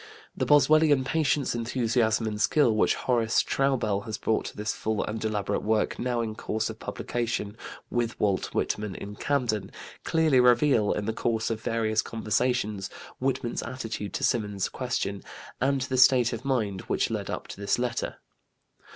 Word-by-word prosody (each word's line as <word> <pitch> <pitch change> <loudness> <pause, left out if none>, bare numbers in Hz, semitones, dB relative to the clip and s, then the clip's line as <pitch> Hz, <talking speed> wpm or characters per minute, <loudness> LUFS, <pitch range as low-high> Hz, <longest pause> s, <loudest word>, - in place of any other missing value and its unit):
The - - -1
Boswellian 145 -1 +5
patience, 150 -1 +1
enthusiasm, 115 -1 +1
and 105 -1 -3
skill 120 -2 +3
which 110 - +3
Horace 120 -2 +1
Traubel 120 -7 0
has 110 -2 -4
brought 110 - 0
to - - -7
his 105 +1 -1
full 110 -1 -1
and 110 +1 -4
elaborate 105 -2 -1
work, 110 0 0
now 125 -1 0
in 110 -2 -3
course 110 0 -2
of - - -12
publication, 115 -3 -3 0.4
With 120 -1 -1
Walt 100 -3 +1
Whitman 105 -3 -2
in 105 +1 -7
Camden, 115 -7 -1 0.3
clearly 160 -5 +3
reveal, 125 -3 +4
in 105 - -1
the 110 - -1
course 115 0 -1
of 110 -1 -3
various 110 -1 +1
conversations, 110 -2 -1 0.3
Whitman's 130 -2 -1
attitude 115 -4 -5
to - - -3
Symonds's 105 -7 0
question 100 -6 -3 0.4
and 135 +1 +2
the 130 0 -1
state 125 -2 +5
of 115 - -5
mind 110 -9 -1
which - - 0
led - - -3
up - - -4
to 100 - -8
this 100 - +1
letter. 120 -1 -2
115 Hz, 160 wpm, -27 LUFS, 105-130 Hz, 0.4 s, Boswellian